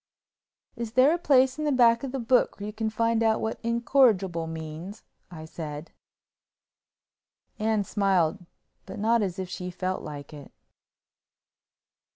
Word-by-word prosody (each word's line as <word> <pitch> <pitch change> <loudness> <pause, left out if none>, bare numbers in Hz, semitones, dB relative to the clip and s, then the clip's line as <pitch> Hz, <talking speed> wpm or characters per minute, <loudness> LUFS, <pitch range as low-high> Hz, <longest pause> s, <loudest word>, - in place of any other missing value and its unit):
"Is 230 -2 -6
there 260 +5 +5
a 345 - -1
place 265 -3 +3
in - - -2
the 300 - +1
back 235 -3 +4
of 270 - -4
the 270 - -3
book 245 -2 +1
where 200 - -5
you 210 - -6
can 220 0 -2
find 230 +1 0
out 220 -1 +2
what 220 - -3
incorrigible 230 -8 +2
means?" 160 +5 -8 0.3
I 160 -3 -9
said. 155 -1 -7 1.7
Anne 215 -1 +1
smiled, 195 -3 +1 0.4
but - - -8
not 225 +2 +2
as 185 -4 -2
if 190 -1 -4
she 180 0 -6
felt 185 +1 -3
like 145 0 -9
it. 145 -2 -11
210 Hz, 150 wpm, -26 LUFS, 175-235 Hz, 1.7 s, there